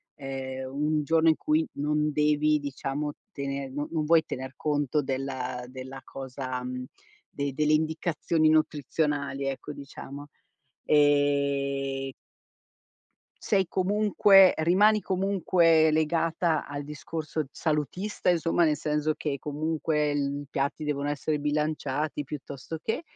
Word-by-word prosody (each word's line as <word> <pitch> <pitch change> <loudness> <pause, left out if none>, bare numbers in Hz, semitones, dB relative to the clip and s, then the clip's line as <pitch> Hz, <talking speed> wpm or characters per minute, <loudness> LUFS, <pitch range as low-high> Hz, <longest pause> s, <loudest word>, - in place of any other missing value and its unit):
ehm, 130 -1 -6
un 150 +2 0
giorno 160 +2 +3
in 160 - +6
cui 310 - +1
non 150 +1 0
devi 150 0 +3
diciamo 145 +1 -3 0.2
tener 140 -1 -4
no 145 +2 -4
non 160 -2 -1
vuoi 160 +1 +5
tener 130 +1 -6
conto 145 -1 0
della 130 -2 -3
della 130 +1 -8
cosa 130 -1 -5
mhmm, 125 0 -5 0.4
de 140 0 -3
delle 150 +2 +2
indicazioni 160 0 +1
nutrizionali, 150 -2 0
ecco, 135 +2 -4
diciamo, 140 0 -9 0.6
ehm 140 -2 +2 1.3
sei 195 -1 +2
comunque 195 0 +5
rimani 205 +7 +4
comunque 180 -4 +3
legata 160 +1 +1
al 145 0 -5
discorso 155 +2 -4
salutista, 165 +7 -1
insomma, 170 0 +3
nel 150 -2 +2
senso 150 0 0
che 140 -3 -3
comunque 150 0 -1
I 145 0 -2
piatti 140 +2 -2
devono 145 -1 -1
essere 150 +1 -1
bilanciati 150 0 -1
piuttosto 140 +1 -7
che... 225 - -1
150 Hz, 115 wpm, -27 LUFS, 140-160 Hz, 1.3 s, in